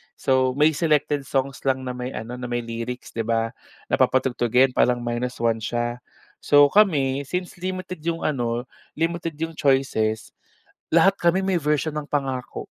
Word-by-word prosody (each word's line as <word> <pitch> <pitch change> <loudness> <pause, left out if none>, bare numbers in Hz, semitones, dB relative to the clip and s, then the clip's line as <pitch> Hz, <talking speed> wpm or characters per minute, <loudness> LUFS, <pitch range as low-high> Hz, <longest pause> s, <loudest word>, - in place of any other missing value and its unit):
So, 130 -1 +1
may 150 +2 +4
selected 150 -2 0
songs 135 0 -1
lang 130 0 +1
na 125 - -3
may 125 +1 -5
ano 120 +3 -6
na 125 - -5
may 120 0 -2
lyrics, 115 +2 -6
'di 115 -1 -4
ba? 115 0 0 0.4
Na - - +2
papatugtugin 125 0 +3
parang 125 -1 +2
minus 120 +1 -2
one 115 -1 +2
siya. 120 +2 -2 0.4
So, 145 -1 +5
kami 140 -9 +3
since 180 +2 -4
limited 185 -1 -5
'yung 165 0 -2
ano, 120 -5 -1 0.3
limited 165 0 -2
'yung 165 0 -3
choices, 110 -7 +1 0.6
lahat 170 +4 +5
kami 175 +2 +2
may 190 -1 +1
version 150 0 0
ng 150 -1 -4
pangako. 135 -4 -3
135 Hz, 160 wpm, -23 LUFS, 120-155 Hz, 0.6 s, So